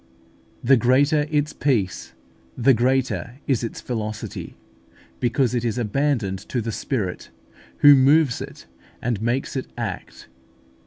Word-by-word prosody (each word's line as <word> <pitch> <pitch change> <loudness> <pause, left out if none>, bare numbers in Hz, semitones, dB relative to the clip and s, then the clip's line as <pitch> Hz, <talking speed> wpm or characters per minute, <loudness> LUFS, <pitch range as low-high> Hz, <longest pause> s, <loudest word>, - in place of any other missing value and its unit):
The 135 +2 +5
greater 140 +5 +3
its 150 0 0
peace, 110 -10 -1 0.4
the 130 +3 +5
greater 125 0 0
is 130 -4 0
its 115 - -5
velocity, 110 -3 -5 0.6
because 125 +1 +1
it 120 -1 0
is 115 -2 -1
abandoned 120 -4 0
to 125 - -1
the 115 0 -3
Spirit, 105 -5 -3 0.5
who 145 - +10
moves 140 -1 +4
it - - -9 0.3
and 120 -4 -2
makes 120 +5 -1
it 130 - -3
act. - - -6
125 Hz, 125 wpm, -23 LUFS, 115-135 Hz, 0.6 s, who